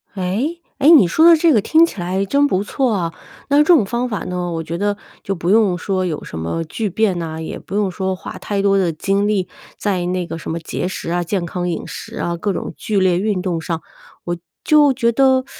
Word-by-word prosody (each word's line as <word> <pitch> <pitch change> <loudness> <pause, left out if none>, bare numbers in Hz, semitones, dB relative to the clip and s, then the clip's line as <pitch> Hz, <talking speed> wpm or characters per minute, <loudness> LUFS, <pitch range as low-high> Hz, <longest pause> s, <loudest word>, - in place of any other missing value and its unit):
诶？ 210 - -2 0.2
诶， 285 - +5
你 295 - +8
说 320 - +3
的 335 -1 +8
这 320 0 +4
个 220 - +4
听 320 +9 +5
起 210 - -7
来 185 +3 -1
真 280 +7 +3
不 190 -7 0
错 255 +4 0
啊。 170 -5 -2 0.4
那 285 - +4
这 - - +7
种 315 - +5
方 240 +4 -2
法 210 -4 -2
呢， 180 -1 -3
我 165 -1 -2
觉 165 +1 -4
得 205 +2 -1 0.3
就 195 - -2
不 170 0 -3
用 205 -3 +4
说 185 0 -1
有 160 -4 -3
什 - - -8
么 85 - -2
巨 210 +6 -3
变 200 -1 +1
呐， 160 -1 -5
也 160 - -5
不 195 - -8
用 205 -2 +1
说 190 0 -2
花 - - -8
太 200 -1 -2
多 195 0 +3
的 185 -3 +2
精 195 +6 0
力 200 -4 0 0.3
在 185 -4 -1
那 180 0 -1
个 165 - -5
什 165 - -6
么 165 - -3
节 165 - -3
食 185 -2 -5
啊、 175 0 0
健 175 +1 -2
康 180 +1 -3
饮 170 - -3
食 - - -8
啊、 170 - -2
各 200 +4 -2
种 - - -4
剧 210 -2 -1
烈 185 -2 +3
运 200 -2 0
动 175 -3 -2
上， 165 0 -3 0.4
我 175 0 -2 0.3
就 295 -2 +5
觉 240 -2 +1
得 260 +1 +3
195 Hz, 260 characters per minute, -19 LUFS, 175-225 Hz, 0.4 s, 你